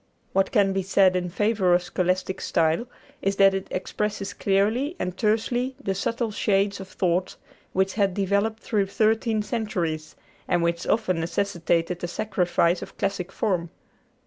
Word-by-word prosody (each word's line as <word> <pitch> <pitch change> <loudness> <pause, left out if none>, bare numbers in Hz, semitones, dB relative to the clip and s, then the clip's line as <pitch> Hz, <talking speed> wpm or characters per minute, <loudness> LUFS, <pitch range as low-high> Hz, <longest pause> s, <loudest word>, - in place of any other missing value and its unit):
What 195 0 +2
can 200 -4 +3
be 195 - 0
said 190 0 +3
in 180 -1 -1
favor 200 -1 +2
of 175 - +1
scholastic 185 +1 -1
"style" 165 +8 +1 0.3
is 195 0 0
that 195 0 +6
it 195 0 -3
expresses 200 +2 -3
clearly 220 - +1
and 180 0 -3
tersely 240 +5 0
the 195 -9 -2
subtle 230 +4 -1
shades 200 -1 +1
of 190 - -7
thought 180 -1 -1 0.4
which 190 0 +1
had 200 -4 +1
developed 200 +3 0
through 205 -3 0
thirteen 220 +1 +1
centuries, 180 -8 -3 0.3
and 175 -1 +2
which 170 0 -1
often 200 -6 +1
necessitated 170 0 -1
a - - 0
sacrifice 180 -3 +1
of - - -9
classic 195 -2 -2
form. 185 -6 -1
195 Hz, 150 wpm, -25 LUFS, 180-215 Hz, 0.4 s, that